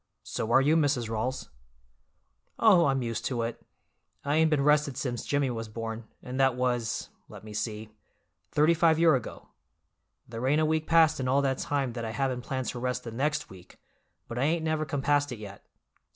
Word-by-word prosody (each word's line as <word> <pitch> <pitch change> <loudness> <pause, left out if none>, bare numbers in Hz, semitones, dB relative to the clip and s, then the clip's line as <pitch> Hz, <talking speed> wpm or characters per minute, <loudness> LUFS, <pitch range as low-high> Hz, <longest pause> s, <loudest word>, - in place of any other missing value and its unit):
"So 110 - -4
are 130 - +6
you, 150 +4 +3
Mrs. 140 -7 +1
Rawls." 125 +4 -3 1.1
"Oh, 190 -8 +5
I'm 135 -2 +1
used 115 -1 -3
to 120 -3 -1
it. 115 +1 -5 0.6
I 145 +1 +1
ain't 160 0 +4
been 150 -3 +2
rested 150 -2 +2
since 125 -4 -3
Jimmy 140 -2 +1
was 115 -1 -5
born, 115 +1 -5 0.2
and 125 +1 -5
that 135 -2 +3
was—let 120 -5 -3
me 110 -1 -10
see—thirty 110 +8 -2
five 165 -1 +3
year 165 -1 +5
ago. 130 -4 -4 0.8
There 115 +2 -4
ain't 150 +3 +3
a 155 - +3
week 155 0 0
passed 160 -2 +4
in 130 - -1
all 135 +2 +2
that 135 -1 0
time 140 -4 -1
that 115 -1 -5
I 110 -1 -4
haven't 130 -2 -1
planned 130 +1 -3
to 120 - -5
rest 125 0 -2
the 115 - -7
next 150 +6 -2
week, 90 -2 -15 0.5
but 120 +1 -5
I - - +1
ain't 160 +3 +1
never 155 -1 0
compassed 145 -1 0
it 125 - -5
yet." 100 -2 -10
130 Hz, 190 wpm, -28 LUFS, 115-150 Hz, 1.1 s, are